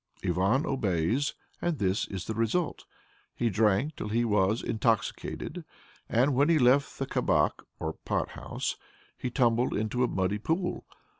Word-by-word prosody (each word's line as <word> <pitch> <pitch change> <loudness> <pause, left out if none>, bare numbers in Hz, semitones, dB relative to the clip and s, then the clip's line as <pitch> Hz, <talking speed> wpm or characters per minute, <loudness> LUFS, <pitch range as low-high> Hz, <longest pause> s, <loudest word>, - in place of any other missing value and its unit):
Ivan 95 - +2
obeys, 110 - 0 0.3
and 175 -3 0
this 95 -2 0
is 95 -2 -5
the 110 - -3
result. 115 +10 -1 0.5
He 120 -2 0
drank 110 +8 +2
till - - -4
he 115 +3 +1
was 105 0 +2
intoxicated, 115 -1 -1 0.5
and 130 +5 +3
when 140 +5 +3
he 165 - +5
left 135 +1 +3
the - - -1
kabak - - +1 0.2
(or 80 -1 -2
pot - - -2
house) - - -4 0.4
he 125 - -3
tumbled 120 -1 +2
into 110 +4 0
a - - +3
muddy 95 0 0
pool. 170 - -2
115 Hz, 150 wpm, -29 LUFS, 100-135 Hz, 0.5 s, he